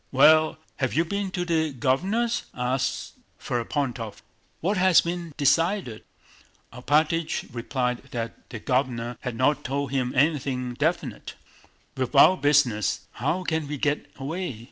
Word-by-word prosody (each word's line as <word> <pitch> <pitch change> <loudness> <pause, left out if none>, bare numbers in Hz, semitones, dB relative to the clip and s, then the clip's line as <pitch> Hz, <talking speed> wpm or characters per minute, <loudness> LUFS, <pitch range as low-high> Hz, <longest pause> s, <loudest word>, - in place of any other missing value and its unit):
Well, 155 +4 +5 0.2
have 130 -2 -1
you 165 +2 +3
been 200 +2 -2
to 180 -1 -3
the 160 -3 +1
Governor's?" 190 - 0
asked 130 +2 -2 0.2
Ferapóntov. 120 -2 -3 0.4
"What 195 +6 0
has 185 -1 +6
been 170 -3 -5
decided?" 165 - +1 0.7
Alpátych 155 +6 0
replied 125 +1 -2
that 115 -2 -6
the 120 - -6
Governor 120 -1 -1
had 125 -3 -4
not 145 +4 +2
told 140 0 -2
him 130 -2 0
anything 130 -3 +1
definite. 150 -3 -2 0.6
"With 130 +2 -3
our 160 +7 +8
business, 145 - +2
how 160 +9 -1
can 160 -3 -1
we 150 0 -4
get 145 +2 -1
away?" 145 -2 -4
140 Hz, 130 wpm, -25 LUFS, 125-165 Hz, 0.7 s, our